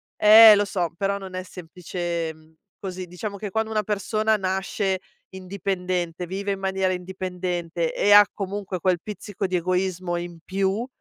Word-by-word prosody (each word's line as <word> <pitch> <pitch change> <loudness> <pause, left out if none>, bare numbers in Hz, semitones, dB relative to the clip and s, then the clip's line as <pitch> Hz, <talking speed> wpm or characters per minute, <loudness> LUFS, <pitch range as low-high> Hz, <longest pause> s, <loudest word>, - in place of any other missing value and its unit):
eh, 215 0 +9
lo 205 - +2
so, 180 -4 -1
però 200 +1 0
non 190 -2 -8
è 185 - -4
semplicem 170 -3 -6 0.2
così. 185 -1 -6
Diciamo 200 +4 -6
che, 205 0 -5
quando 220 +2 -1
una 215 -1 0
persona 215 +2 0
nasce 190 0 -1 0.4
indipendente, 180 -2 -3
vive 200 +2 -3
in 195 - -3
maniera 190 -1 0
indipendente, 180 -2 -3
e 205 - +3
ha 205 0 +9
comunque 195 -1 -4
quel 180 0 +1
pizzico 205 -1 -5
di 185 -1 0
egoismo 185 0 -1
in 175 -1 -6
più, 195 +5 -1
190 Hz, 155 wpm, -24 LUFS, 180-200 Hz, 0.4 s, eh